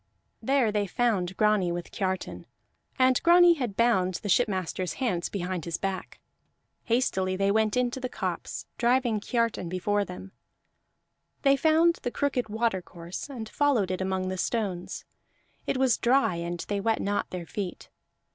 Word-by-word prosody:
There 255 -2 +2
they 205 -1 0
found 190 -4 0
Grani 210 -4 +3
with 175 0 -5
Kiartan, 190 -1 -3 0.5
and 255 -1 +4
Grani 345 0 +7
had 245 -10 -4
bound 190 -6 +2
the 205 - -5
shipmaster's 185 -4 0
hands 210 -10 -1
behind 185 -3 -3
his 170 -1 -2
back. 195 -1 -4 0.7
Hastily 190 -6 +1
they 195 +1 +2
went 215 +1 +2
into 250 +1 0
the 255 0 -3
copse, - - -4
driving 240 -2 +2
Kiartan 230 -5 -1
before 205 +3 0
them; 190 0 -9 1.1
they 275 -1 +5
found 320 +4 +3
the - - -2
crooked 255 -4 -1
watercourse 190 -3 -3
and 235 -5 -6
followed 235 -7 +1
it 185 - -2
among 190 0 -1
the 185 0 -4
stones; 195 -7 -2 0.6
it - - 0
was 260 -3 +3
dry 255 -4 +3
and 170 0 -4
they 205 -1 -1
wet 225 +1 +1
not 205 0 -1
their 180 -2 -5
feet. 190 0 -6
210 Hz, 150 wpm, -27 LUFS, 185-245 Hz, 1.1 s, Grani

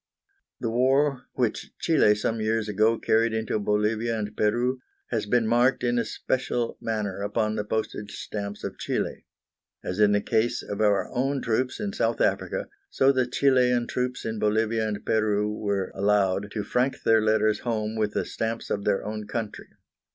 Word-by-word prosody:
The 115 -3 -2
war 135 +3 +2
which 120 -4 -2
Chili 150 -11 +4
some 110 +2 -2
years 110 0 0
ago 110 +2 +2
carried 110 +1 +2
into 110 -1 -1
Bolivia 105 +2 0
and 105 0 -4
Peru 120 +4 +1 0.3
has 110 -3 -1
been 120 +1 +2
marked 120 +3 +3
in 120 0 +2
a - - 0
special 120 -2 -2
manner 105 -3 -2
upon 105 +1 0
the 105 - -1
postage 105 -1 -3
stamps 100 -1 -5
of - - -5
Chili. - - -3 0.6
As 90 +3 -4
in 105 -1 +5
the 105 - +3
case 110 +3 0
of 105 +1 -4
our 105 -2 +3
own 135 +2 0
troops 125 +2 -1
in 205 -1 -3
South - - 0
Africa, - - 0 0.2
so 135 +1 +4
the 130 -2 +1
Chilian 125 -2 +3
troops 125 +1 -3
in 110 -1 -3
Bolivia 110 +1 +1
and 105 -1 -4
Peru 105 -1 +1
were 100 -3 -2
allowed 100 0 +1
to 105 - -2
frank 125 +6 0
their 110 -1 +4
letters 110 -1 +2
home 110 -2 -2
with 105 -2 0
the - - -1
stamps 115 0 -3
of 100 - -2
their 100 -2 +1
own 105 0 -5
country. 115 -3 -5
110 Hz, 175 wpm, -26 LUFS, 105-120 Hz, 0.6 s, in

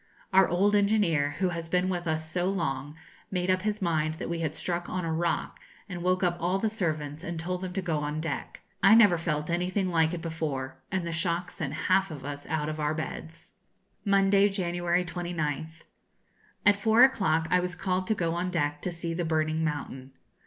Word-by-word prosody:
Our 190 0 +6
old 200 +4 +3
engineer, 200 -9 +2
who 185 -2 +1
has 165 -1 -5
been 180 +1 +2
with 175 -2 -2
us 160 0 -1
so 175 +3 0
long, 150 -6 -2 0.3
made 180 -1 0
up 185 0 +1
his 210 0 -2
mind 155 -2 +1
that 170 - -5
we 170 - -2
had 160 -2 -2
struck 175 0 -3
on 185 -2 -2
a 165 - -1
rock, 170 +1 -1 0.3
and 180 -3 -6
woke 185 +1 +1
up 175 -1 +2
all 180 +3 +1
the 220 +3 0
servants 155 -7 -2
and 170 -2 -4
told 180 +2 -3
them 185 -1 -4
to 190 0 -2
go 165 -4 0
on 150 +1 -3
deck. 165 +1 -4 0.2
I 220 - +7
never 205 -7 +6
felt 150 -1 -2
anything 180 +2 0
like 165 0 +2
it 165 - -6
before, 135 -5 -4
and 185 -3 -1
the 170 - -3
shock 170 +1 -1
sent 145 -3 -4
half 190 +1 +3
of 145 -5 -8
us 145 0 -6
out 155 -1 -1
of 155 0 -4
our 150 +1 0
beds. 160 +1 -7 0.5
Monday, 200 0 +4
January 175 -2 0
29th. 160 -3 -4 0.8
At 205 -1 +6
four 220 +3 +6
o'clock 165 -11 +3
I 180 - +5
was 180 0 -2
called 185 +1 -1
to 220 - +2
go 165 -4 0
on 175 +2 -1
deck 145 -4 -1
to 180 - -2
see 170 0 -4
the 175 +1 -2
burning 160 0 0
mountain. 135 -4 -4
170 Hz, 205 wpm, -28 LUFS, 160-185 Hz, 0.8 s, I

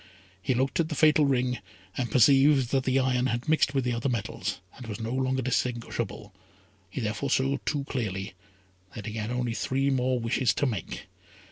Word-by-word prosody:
He 125 +7 0
looked 135 +5 0
at 160 -1 +1
the 155 - -3
fatal 150 -1 +5
ring, 125 -3 +1 0.4
and 125 -2 -2
perceived 135 +2 +5
that 135 -1 +1
the 130 0 +2
iron 130 -1 +2
had 120 0 -2
mixed 155 -3 +2
with 135 - +2
the 125 0 0
other 120 +4 -1
metals, 115 -5 -3 0.2
and 125 - -10
was 105 0 -5
no 115 +1 -3
longer 130 0 0
distinguishable, 120 -4 -2 0.6
he 100 - -5
therefore 110 +5 -2
saw 135 +1 +2
too 145 -3 0
clearly 100 -8 -3 0.6
that 105 - -7
he 110 - -5
had 110 0 -3
only 125 -1 -1
three 135 +4 0
more 130 -1 +1
wishes 115 -1 +1
to - - +1
make. 110 - -4
125 Hz, 190 wpm, -28 LUFS, 115-135 Hz, 0.6 s, fatal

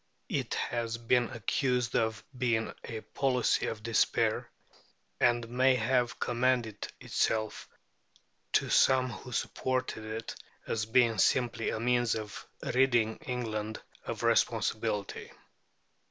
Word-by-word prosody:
It - - -1
has 115 -1 -2
been 120 +1 +2
accused 125 0 0
of 110 -1 0
being 120 -3 0
a 110 -2 -5
policy 130 -1 +1
of 110 -1 -5
despair; 115 -1 +1 0.7
and 120 -1 +3
may 130 +2 +3
have 125 +1 +1
commended 120 -3 0
itself 110 -1 -1 0.8
to - - +3
some 130 -1 +5
who 125 +3 -9
supported 130 -1 -2
it 110 +1 -5 0.3
as 110 -1 -2
being 115 -2 +3
simply 120 -1 +2
a - - -2
means 120 0 +2
of 110 -1 -6 0.2
ridding 120 -4 +2
England 110 -4 -4 0.2
of - - -5
responsibility. 100 -1 0
120 Hz, 110 wpm, -30 LUFS, 110-125 Hz, 0.8 s, some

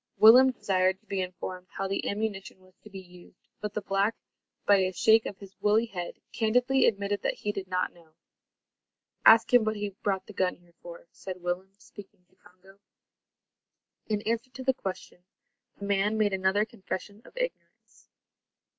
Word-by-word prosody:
Willem 250 +4 +8
desired 190 -5 0
to 220 - -36
be 195 -2 -2
informed 185 0 -6
how 195 - -4
the 195 - -2
ammunition 200 -2 -4
was 185 0 -23
to 215 - -15
be 195 - -10
used, 180 0 -17
but 210 0 -5
the 210 - -2
black, 200 +3 +1 0.5
by 205 - +6
a 185 -1 +1
shake 220 +4 +4
of 200 - -7
his 195 -1 -13
woolly 215 +2 +3
head, 180 -6 -6 0.2
candidly 250 +4 +2
admitted 200 -1 -1
that - - -1
he 210 - -3
did 195 -2 -6
not 180 0 -1
know. 165 -2 -22 1.1
"Ask 225 +2 +7
him 245 -2 +7
what 215 0 -1
he 205 -1 -3
brought 195 -2 -1
the 210 - -12
gun 185 -1 0
here 175 -1 -26
for," 170 -1 -11
said 185 -2 -8
Willem, 185 +2 -3
speaking 195 -3 -15
to - - -30
Congo. 190 +2 -21 1.3
In 210 -1 -1
answer 230 +2 -2
to 260 +1 -9
the 265 0 +2
question, 185 -5 -7 0.5
the 200 - -7
man 200 +2 +1
made 210 -2 +2
another 190 +2 +2
confession 205 -2 -7
of - - -18
ignorance. - - -6
200 Hz, 175 wpm, -28 LUFS, 185-220 Hz, 1.3 s, Willem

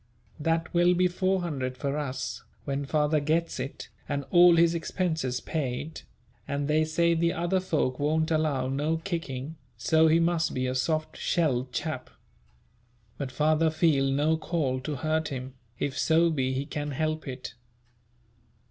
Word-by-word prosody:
That 165 +2 0
will 175 +1 +4
be 180 +1 +4
400*l.* 175 -8 -1
for 140 +2 -2
us, 130 -5 -3 0.2
when 140 0 -2
father 150 +1 +2
gets 160 +3 0
it, 135 - -6 0.2
and 140 -1 -2
all 175 -1 +7
his 170 0 +4
expenses 160 -6 -1
paid, 150 +1 -4 0.5
and 140 0 -2
they 155 +1 +3
say 170 +2 +2
the 170 +1 +1
other 175 +2 0
folk 155 -8 -1
won't 160 +2 +1
allow 150 -5 +1
no 145 +5 0
kicking, 160 -4 -4 0.2
so 160 +7 +4
he 160 +1 +4
must 170 0 +1
be 130 0 0
a 130 - -1
soft 155 +4 -1
shelled 135 -7 0
chap; - - -4 1.1
but 135 -2 -3
father 155 +3 +2
feel 155 -4 +2
no 150 +4 +2
call 150 -6 -1
to 145 +3 -4
hurt 155 +3 0
him, 130 -2 -6 0.2
if 140 -2 -2
so 165 +1 +4
be 130 -4 0
he 130 +2 -2
can 145 0 -4
help 155 +2 -2
it. 130 -2 -6
155 Hz, 155 wpm, -28 LUFS, 135-165 Hz, 1.1 s, all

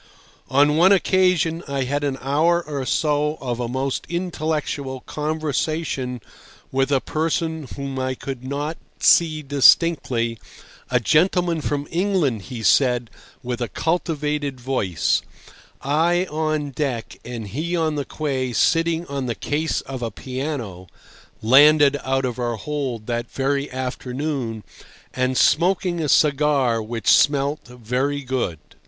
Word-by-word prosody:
On 145 +3 +4
one 180 +4 +6
occasion 180 -4 +2
I 140 -1 -1
had 145 +3 -2
an 140 -2 -1
hour 165 +6 +2
or 140 -4 -4
so 150 0 +1
of 125 -2 -3
a 120 - -2
most 130 +2 -2
intellectual 155 -6 -3
conversation 150 -4 -2 0.5
with 135 +1 +1
a 135 - +4
person 160 0 -2
whom 135 -1 -4
I 130 0 -1
could 130 -1 -7
not 145 +4 -3 0.2
see 155 -2 +4
distinctly, 135 -5 +3 0.5
a 125 - +3
gentleman 170 - +2
from 145 0 -2
England, 170 - +1
he 120 -4 -6
said, 125 +1 +3 0.3
with 125 0 -4
a 120 - 0
cultivated 150 -4 -2
voice, 100 - 0 0.6
I 170 +6 +2
on 155 -2 -1
deck 130 -4 -3
and 115 -4 -6
he 160 - -2
on 160 -2 +1
the 145 -1 -2
quay 135 -4 -3
sitting 165 +4 +2
on 140 -4 -4
the 120 - -2
case 155 +2 -1
of 130 -2 -7
a 115 - -2
piano 125 - -5 0.6
(landed 145 +4 +6
out 135 0 0
of 125 0 -4
our 120 -1 -1
hold 125 -1 -4
that 120 0 -3
very 140 +1 -1
afternoon), 130 -2 -4 0.5
and 130 0 0
smoking 175 +1 +2
a 150 - -1
cigar 140 -6 +3
which 115 -1 -6
smelt 145 0 +3
very 125 +4 -2
good. 125 -10 -2
140 Hz, 135 wpm, -22 LUFS, 125-155 Hz, 0.6 s, one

